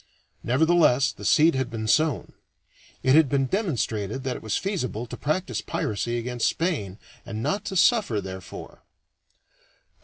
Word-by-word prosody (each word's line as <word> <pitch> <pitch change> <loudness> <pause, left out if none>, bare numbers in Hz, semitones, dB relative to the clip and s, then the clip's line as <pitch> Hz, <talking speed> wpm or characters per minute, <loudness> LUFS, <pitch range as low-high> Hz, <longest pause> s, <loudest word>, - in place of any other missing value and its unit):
Nevertheless, 140 -1 +3
the - - -13
seed 160 +2 +5
had 130 -2 -1
been 110 -2 -4
sown; 155 +3 +1 0.7
it 130 - +4
had 155 -2 +5
been 135 0 +1
demonstrated 130 - -2
that 130 -2 -2
it - - -8
was 110 -1 -1
feasible 125 - -3
to - - -8
practice 155 +6 -2
piracy 120 +3 -2
against 120 0 -1
Spain 140 - -2 0.3
and 110 +1 -5
not 155 +9 -1
to 195 - -4
suffer 195 - +3
therefor. 95 -2 -9
130 Hz, 145 wpm, -25 LUFS, 110-160 Hz, 0.7 s, seed